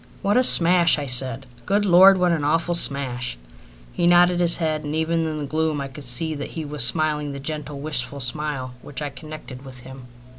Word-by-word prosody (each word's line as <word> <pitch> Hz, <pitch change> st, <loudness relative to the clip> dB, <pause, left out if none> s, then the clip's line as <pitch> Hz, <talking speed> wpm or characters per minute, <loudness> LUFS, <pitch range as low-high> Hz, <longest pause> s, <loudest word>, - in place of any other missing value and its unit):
"What 205 Hz, +1 st, 0 dB
a 255 Hz, -, +3 dB
smash!" 175 Hz, -6 st, +5 dB
I 145 Hz, -, -5 dB
said. 130 Hz, 0 st, +1 dB, 0.2 s
"Good 205 Hz, +1 st, 0 dB
Lord, 190 Hz, +1 st, +6 dB
what 180 Hz, -1 st, +1 dB
an 160 Hz, -3 st, -2 dB
awful 165 Hz, +4 st, 0 dB
smash!" 130 Hz, -, -2 dB, 0.6 s
He 175 Hz, -, 0 dB
nodded 175 Hz, 0 st, +4 dB
his 170 Hz, -1 st, +3 dB
head, 155 Hz, -2 st, -3 dB
and 150 Hz, +1 st, -5 dB
even 160 Hz, +1 st, -1 dB
in 155 Hz, -1 st, -5 dB
the 150 Hz, -, -5 dB
gloom 155 Hz, +1 st, -2 dB
I 140 Hz, 0 st, -6 dB
could 135 Hz, +1 st, -11 dB
see 140 Hz, +7 st, +2 dB
that 145 Hz, -2 st, -7 dB
he 160 Hz, -2 st, -7 dB
was 145 Hz, -3 st, 0 dB
smiling 150 Hz, +2 st, +1 dB
the 140 Hz, -, -8 dB
gentle, 150 Hz, 0 st, -7 dB
wistful 140 Hz, -2 st, -4 dB
smile 130 Hz, 0 st, -4 dB
which 145 Hz, 0 st, -8 dB
I 145 Hz, -, -5 dB
connected 140 Hz, -2 st, -11 dB
with 130 Hz, -2 st, -10 dB
him. 130 Hz, 0 st, -12 dB
150 Hz, 210 wpm, -21 LUFS, 135-165 Hz, 0.6 s, Lord